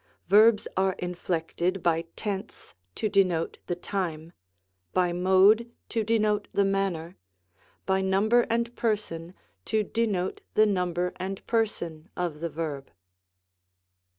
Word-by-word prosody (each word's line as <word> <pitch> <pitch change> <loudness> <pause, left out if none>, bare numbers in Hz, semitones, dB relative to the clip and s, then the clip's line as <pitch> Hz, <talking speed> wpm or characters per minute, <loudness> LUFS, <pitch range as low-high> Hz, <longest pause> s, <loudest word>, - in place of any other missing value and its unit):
Verbs 215 +2 +6
are 190 0 +2
inflected 180 +1 -2
by 165 -1 +2
tense 205 0 -5 0.2
to 215 - 0
denote 185 -5 +1
the 175 - -1
time; 175 -3 -4 0.6
by 180 -1 +2
mode, 190 +6 +4 0.2
to 225 -2 0
denote 215 -2 +1
the 200 - +2
manner; 190 -4 -1 0.7
by 190 0 +2
number 210 +5 +3
and 235 +1 0
per 225 -2 +2
son, 170 -3 -9 0.3
to 215 - 0
denote 205 -4 -1
the 215 - +6
number 180 -3 0
and 190 +1 -5
person 180 -8 -2
of 170 -4 -2
the 170 +1 -3
verb. 150 -3 -5
190 Hz, 125 wpm, -27 LUFS, 175-210 Hz, 0.7 s, Verbs